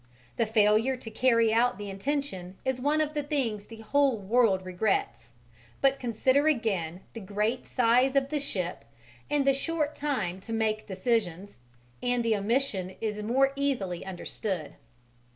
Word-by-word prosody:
The 230 - +2
failure 220 +4 +3
to 225 -2 -9
carry 230 -3 +3
out 235 -2 +3
the 205 0 -6
intention 195 -5 -3
is 260 -1 -1
one 295 +3 +2
of 305 0 -1
the 300 - -1
things 255 -8 -2
the 225 0 -11
whole 270 +2 +2
world 200 -2 +2
regrets, 185 - -1 0.5
but 275 0 +3
consider 260 +5 +2
again 195 - 0
the 230 - -6
great 210 +4 -2
size 250 +2 +3
of 275 0 +2
the 300 0 -1
ship 185 -10 -3 0.5
and 290 -2 +1
the 275 - +5
short 300 +1 -1
time 250 -12 -2
to 225 +4 -7
make 220 -1 0
decisions, 195 - -1 0.4
and 245 -1 0
the 225 -1 +3
omission 205 -3 -1
is 210 -1 -3
more 265 +5 +2
easily 245 -11 -1
understood. 185 -2 -4
230 Hz, 150 wpm, -28 LUFS, 200-270 Hz, 0.5 s, the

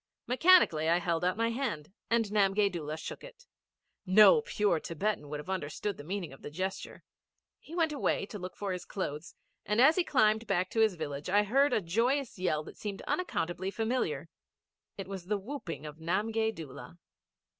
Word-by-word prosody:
Mechanically 250 - +5
I 170 - +4
held 170 -1 -1
out 180 +2 +1
my 230 0 +1
hand 220 - -3 0.2
and 230 -1 +3
Namgay 200 -1 +3
Doola 155 -3 -4
shook - - -7
it. - - -13 0.6
No 210 - +7
pure 205 - +1
Thibetan 165 -1 -3
would 150 0 -4
have 150 - -9
understood 190 +2 -3
the - - -9
meaning 180 -2 -4
of 135 - -15
the - - -7
gesture. 185 +5 -5 0.6
He 330 - -11
went 325 -3 +2
away 280 - 0
to 205 0 -8
look 185 0 -7
for 200 -2 -3
his 180 -1 -4
clothes, 150 -4 -5 0.3
and 210 +2 0
as 290 +7 +6
he 365 - +4
climbed 220 -6 +2
back 185 -1 0
to 225 - -1
his 220 -4 +4
village, 145 -1 -5
I 205 +2 +4
heard 275 +7 +3
a - - +2
joyous 230 +7 0
yell 155 -4 0
that - - -12
seemed 200 -2 -5
unaccountably 185 - -2
familiar. 235 - -1 0.7
It 195 -2 -6
was 190 -2 -7
the 210 +1 +1
whooping 195 - -6
of 150 0 -8
Namgay 220 +7 0
Doola. 145 -1 -9
195 Hz, 185 wpm, -31 LUFS, 170-225 Hz, 0.7 s, No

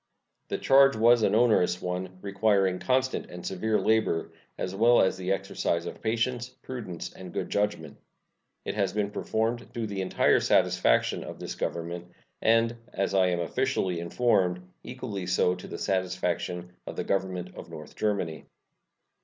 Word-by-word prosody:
The - - -2
charge 135 -1 +5
was 115 +2 +5
an 105 - +3
onerous 110 -6 +3
one, 90 +1 -4
requiring 100 -2 +2
constant 130 0 0
and 90 0 -9
severe 105 +3 0
labor, 110 -7 +1 0.3
as 95 - -3
well 115 +4 +5
as 95 - +3
the 95 0 -3
exercise 85 -3 -1
of - - -7
patience, 120 +2 -1
prudence, 105 -10 -6
and 90 -1 -10
good - - -4
judgment. 105 0 -1 0.7
It - - -2
has 100 -2 0
been 105 -1 -1
performed 115 +3 -2
to 115 -1 -2
the 100 -2 -3
entire 95 - +3
satisfaction - - +2
of - - -8
this - - -5
Government, 85 +1 -4 0.3
and, 115 +1 +3 0.2
as 100 0 -1
I 95 -1 +4
am 90 -1 0
officially 95 -3 0
informed, 90 -1 +1 0.2
equally 110 -7 -5
so 90 0 +3
to 90 - -8
the - - -6
satisfaction 90 -1 -2 0.2
of - - -6
the - - -2
Government 90 -2 -2
of - - -9
North - - -10
Germany. 95 -7 -2
100 Hz, 155 wpm, -28 LUFS, 90-115 Hz, 0.7 s, charge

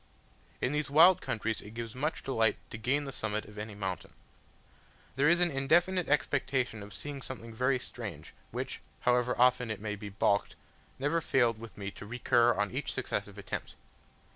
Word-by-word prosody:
In 125 - +1
these 150 0 -1
wild 165 +5 +7
countries 110 0 -2
it 105 +2 -11
gives 115 -1 -5
much 150 +5 -2
delight 115 -5 +2
to 115 - -6
gain 135 +6 +1
the 135 - -5
summit 110 -4 -2
of 105 0 -10
any 105 0 -6
mountain. 95 -2 -4 1.0
There 140 +3 +4
is 170 0 +5
an 175 -1 +3
indefinite 170 +7 +2
expectation 130 -5 +1
of 100 0 -9
seeing 145 +2 -6
something 115 -3 -7
very 130 +3 +2
strange, 125 - -7 0.2
which, - - -4 0.2
however 125 0 +2
often 125 -1 +4
it 110 - -3
may 105 0 -3
be 105 0 -7
balked, 100 +1 +1 0.4
never 145 +5 +1
failed 120 -7 +2
with 115 0 -10
me 100 -1 -4
to 105 - -10
recur 120 +1 +3
on 105 -2 0
each - - -2
successive - - -3
attempt. - - -5
125 Hz, 175 wpm, -31 LUFS, 110-140 Hz, 1.0 s, wild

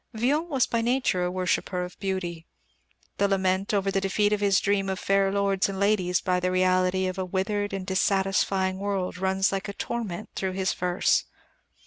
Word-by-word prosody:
Villon 290 +9 0
was 270 -5 +2
by 230 - -1
nature 240 -6 +1
a - - 0
worshipper 180 0 -1
of 180 - -12
beauty. 175 -4 -3 0.7
The 200 - +4
lament 190 0 0
over 200 -1 +1
the 195 - 0
defeat 205 +2 +1
of 210 - 0
his 200 -2 +4
dream 200 -1 0
of 190 - -2
fair 195 0 +2
lords 200 -1 +1
and 195 -1 -4
ladies 195 -3 +2
by 180 -2 +1
the 180 0 0
reality 185 0 +2
of 185 +1 -3
a - - 0
withered 205 +2 -1
and 195 -1 -4
dissatisfying 190 0 +1
world 195 -2 -2
runs 190 +1 +1
like 195 +1 -3
a - - -5
torment 215 -6 -4
through 190 -1 -2
his 190 -1 0
verse. 180 0 +1
195 Hz, 185 wpm, -26 LUFS, 185-200 Hz, 0.7 s, The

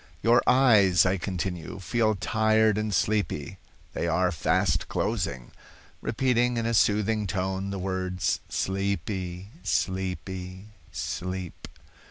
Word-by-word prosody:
"'Your 120 +1 +5
eyes,' 110 -9 +5
I 95 +1 +2
continue, 90 -1 -4
'feel 110 +2 +1
tired 110 +2 +2
and 110 0 -2
sleepy. 95 -2 -1 0.3
They - - -2
are 90 +2 +2
fast 80 - +1
closing' 60 -1 -2 0.5
repeating 120 0 +1
in 115 - -1
a 115 - 0
soothing 105 0 +2
tone 95 +1 -2
the 100 - -4
words 95 -1 -1
'sleepy, 95 -1 -2
sleepy, 95 +2 -3 0.2
sleep. 90 -1 -5
95 Hz, 110 wpm, -27 LUFS, 90-110 Hz, 0.5 s, Your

